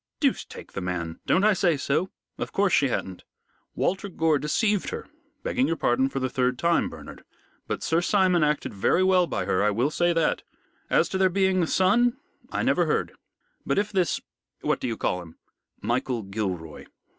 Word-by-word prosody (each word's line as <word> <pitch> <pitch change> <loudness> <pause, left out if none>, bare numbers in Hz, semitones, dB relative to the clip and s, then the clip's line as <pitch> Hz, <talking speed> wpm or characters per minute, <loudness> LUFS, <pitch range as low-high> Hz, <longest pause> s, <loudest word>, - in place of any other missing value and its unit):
"Deuce - - +1
take - - -12
the 100 - -5
man! 85 -2 -4
Don't 190 - +3
I 215 0 +5
say 175 -5 +2
so? 150 +7 0 0.3
Of - - -3
course 200 -1 +1
she 140 - +4
hadn't. 95 -7 -4 0.5
Walter 195 +2 -1
Gore 160 -4 +1
deceived 205 +7 +1
her 460 0 -6 0.4
begging 255 +1 +1
your 165 - 0
pardon 130 -2 +1
for 135 - -3
the 130 - 0
third 125 -2 0
time, 170 +5 +2
Bernard - - -11 0.5
but - - -3
Sir 165 +1 +2
Simon 185 -3 +3
acted 150 -1 0
very 105 - +2
well 185 -2 +4
by - - -2
her. 95 - +1
I 105 - +3
will 120 +8 +1
say 175 +2 +2
that. 165 -2 +1 0.5
As - - +3
to 190 - -2
there 190 -1 +4
being 190 0 +2
a 165 - +1
son, 230 +8 +3 0.3
I - - -1
never - - +2
heard. - - 0 0.5
But - - -1
if 205 +1 +1
this 185 -4 +1 0.4
what - - 0
do - - -3
you 115 -2 -3
call 90 - -1
him?" 80 -2 -13 0.5
"Michael 120 -1 -1
Gilroy." 95 -6 -4
165 Hz, 190 wpm, -26 LUFS, 120-190 Hz, 0.5 s, I